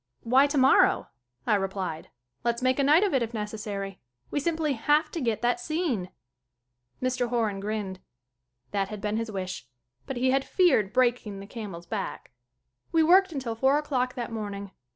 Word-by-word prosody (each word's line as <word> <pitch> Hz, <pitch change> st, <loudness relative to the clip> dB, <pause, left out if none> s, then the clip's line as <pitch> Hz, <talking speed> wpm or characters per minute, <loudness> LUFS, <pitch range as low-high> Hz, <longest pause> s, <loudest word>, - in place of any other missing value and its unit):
"Why 260 Hz, +4 st, +5 dB
tomorrow?" 275 Hz, -2 st, +4 dB, 0.4 s
I -, -, +2 dB
replied. 190 Hz, -5 st, -2 dB, 0.3 s
"Let's 235 Hz, +1 st, 0 dB
make 255 Hz, +1 st, +2 dB
a -, -, +3 dB
night 305 Hz, +7 st, +5 dB
of 400 Hz, -, +1 dB
it 265 Hz, -, +3 dB
if 230 Hz, 0 st, -3 dB
necessary. 210 Hz, -2 st, -5 dB, 0.3 s
We -, -, 0 dB
simply 315 Hz, -1 st, 0 dB
have 295 Hz, +6 st, +2 dB
to 330 Hz, -, -4 dB
get 230 Hz, -3 st, -1 dB
that 245 Hz, +9 st, +2 dB
scene." 310 Hz, -, -1 dB, 0.9 s
Mr. 255 Hz, -1 st, 0 dB
Horan 225 Hz, -5 st, 0 dB
grinned. 200 Hz, -2 st, -3 dB, 0.7 s
That 195 Hz, -1 st, 0 dB
had 210 Hz, -1 st, -6 dB
been 210 Hz, +1 st, -1 dB
his 230 Hz, 0 st, -2 dB
wish. 185 Hz, -, -5 dB, 0.4 s
But 270 Hz, -, -4 dB
he 255 Hz, +1 st, +2 dB
had 270 Hz, 0 st, +2 dB
feared 300 Hz, -, +3 dB
breaking 240 Hz, -5 st, +1 dB
the 195 Hz, -, -8 dB
camel's 200 Hz, -6 st, -7 dB
back. -, -, -5 dB, 0.6 s
We 325 Hz, -1 st, +4 dB
worked 375 Hz, +3 st, +5 dB
until 260 Hz, -6 st, -3 dB
four 265 Hz, +5 st, +3 dB
o'clock 260 Hz, -4 st, -1 dB
that 240 Hz, -2 st, -4 dB
morning. 200 Hz, -3 st, -5 dB
235 Hz, 170 wpm, -27 LUFS, 205-275 Hz, 0.9 s, Why